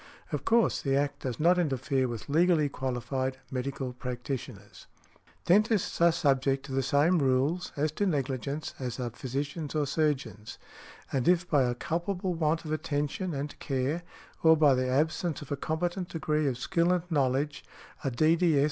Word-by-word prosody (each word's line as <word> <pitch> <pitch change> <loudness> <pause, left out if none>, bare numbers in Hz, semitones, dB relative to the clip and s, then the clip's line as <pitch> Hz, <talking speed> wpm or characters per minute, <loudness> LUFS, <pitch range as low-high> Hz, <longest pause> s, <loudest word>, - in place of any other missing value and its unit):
Of - - -3
course, 230 0 +3
the 135 -1 +1
Act 140 0 0
does 125 -4 -4
not 175 +3 +4
interfere 135 -4 0
with 120 -3 -6
legally 160 0 +3
qualified 130 0 -2
medical 130 0 -3
practitioners. 125 0 -6 0.6
Dentists 210 0 +2
are 170 0 +7
subject 135 -4 +1
to 140 - -9
the 135 0 +1
same 145 +7 +3
rules, 140 +6 +1
as 150 +1 +1
to 200 +6 -1
negligence, 140 -1 -2
as 125 -1 -4
are 120 -2 -3
physicians 140 +5 -4
or 150 -1 +2
surgeons, 135 -8 -2 0.6
and 130 -3 0
if 175 0 +3
by 145 -5 +3
a 120 0 -1
culpable 180 +7 -2
want 160 0 0
of 155 - -5
attention 155 +3 -2
and 145 +1 -5
care, 135 +5 -1 0.4
or 160 0 +6
by 150 -3 +5
the 130 0 0
absence 155 +4 0
of 145 - -13
a - - +1
competent 175 +5 -2
degree 155 -2 0
of 130 -3 -1
skill 170 +6 +1
and 180 -2 +1
knowledge, 140 0 0 0.4
a 135 - +1
D.D.S. 160 +4 +3
145 Hz, 165 wpm, -29 LUFS, 130-165 Hz, 0.6 s, are